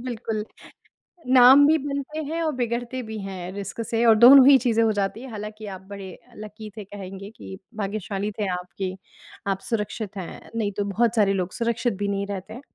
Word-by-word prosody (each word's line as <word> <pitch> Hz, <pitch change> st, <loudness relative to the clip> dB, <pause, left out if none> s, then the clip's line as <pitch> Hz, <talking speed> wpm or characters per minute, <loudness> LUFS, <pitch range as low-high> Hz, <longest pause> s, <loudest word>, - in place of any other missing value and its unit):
बिल्कुल, 225 Hz, -3 st, -4 dB, 0.9 s
नाम 260 Hz, +3 st, +8 dB
भी 315 Hz, -, +5 dB
बनते 280 Hz, +2 st, -4 dB
हैं 330 Hz, +3 st, -3 dB
और 315 Hz, -, 0 dB
बिगड़ते 245 Hz, +1 st, -2 dB
भी 220 Hz, -2 st, -7 dB
हैं 185 Hz, -2 st, -6 dB
रिस्क 200 Hz, +3 st, -6 dB
से 230 Hz, 0 st, 0 dB
और 225 Hz, -, +8 dB
दोनों 260 Hz, +3 st, +9 dB
ही 280 Hz, -, +9 dB
चीज़ें 230 Hz, -2 st, +1 dB
हो 225 Hz, -, +3 dB
जाती 200 Hz, +3 st, -1 dB
हैं। 265 Hz, -, -9 dB
हालाँकि 215 Hz, 0 st, -7 dB
आप 185 Hz, -, -10 dB
बड़े, 190 Hz, -2 st, -8 dB, 0.2 s
लकी 215 Hz, 0 st, -9 dB
थे 210 Hz, -, -7 dB
कहेंगे 195 Hz, 0 st, -9 dB
कि 190 Hz, -, -9 dB, 0.2 s
भाग्यशाली 200 Hz, 0 st, -3 dB
थे 210 Hz, -, 0 dB
आप 180 Hz, 0 st, -8 dB
कि 190 Hz, -1 st, -3 dB, 0.6 s
आप 195 Hz, -, -4 dB
सुरक्षित 210 Hz, -2 st, -3 dB
हैं, 185 Hz, -3 st, -8 dB
नहीं 205 Hz, -3 st, -1 dB
तो -, -, +1 dB
बहुत 220 Hz, +3 st, +1 dB
सारे 200 Hz, -2 st, +4 dB
लोग 180 Hz, 0 st, -4 dB
सुरक्षित 235 Hz, -1 st, -1 dB
भी 200 Hz, -, 0 dB
नहीं 200 Hz, 0 st, -1 dB
रहते। 200 Hz, +5 st, -7 dB
215 Hz, 195 wpm, -24 LUFS, 195-240 Hz, 0.9 s, दोनों